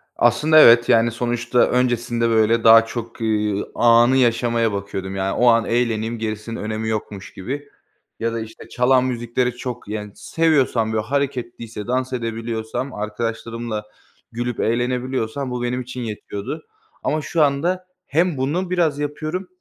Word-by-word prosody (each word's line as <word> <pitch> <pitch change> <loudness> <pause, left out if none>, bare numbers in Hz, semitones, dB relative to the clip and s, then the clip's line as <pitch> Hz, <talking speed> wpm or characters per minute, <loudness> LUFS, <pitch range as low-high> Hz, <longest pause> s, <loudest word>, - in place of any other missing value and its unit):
Aslında 155 +1 +4
evet, 120 -3 +7
yani, 115 +1 +4
sonuçta 120 +1 -1
öncesinde, 120 -2 +1
böyle, 115 0 +3
daha 115 0 +8
çok, 115 0 -7
eee, 105 -2 0
anı 120 +2 +5
yaşamaya 115 -2 +2
bakıyordum, 95 -1 -4
yani, 95 0 -1
o 125 - +3
an 115 -1 +5
eğleneyim 115 -1 0
gerisinin 110 +1 -4
önemi 110 +1 -3
yokmuş 105 -2 -5
gibi 140 +9 -6 0.5
ya 115 0 -1
da, 115 - -2
işte, 110 0 -9
çalan 125 +1 +3
müzikleri 125 0 -1
çok, 125 -4 -6
yani, 105 -1 -5
seviyorsam, 135 -9 +1
böyle, 110 -1 0
hareketliyse 120 -4 -3
dans 130 +1 -1
edebiliyorsam 115 +1 -4
arkadaşlarımla 115 +1 -4 0.5
gülüp 120 0 -3
eğlenebiliyorsam 125 +2 -1
bu 125 -1 -3
benim 125 +1 -1
için 125 0 -7
yetiyordu. 110 +5 -6 0.4
Ama 155 +1 0
şu 160 +1 +1
anda 170 +6 0 0.2
hem 165 0 +1
bunu 165 +8 -1
biraz 165 -5 +1
yapıyorum 155 +5 -3
120 Hz, 140 wpm, -21 LUFS, 110-130 Hz, 0.5 s, daha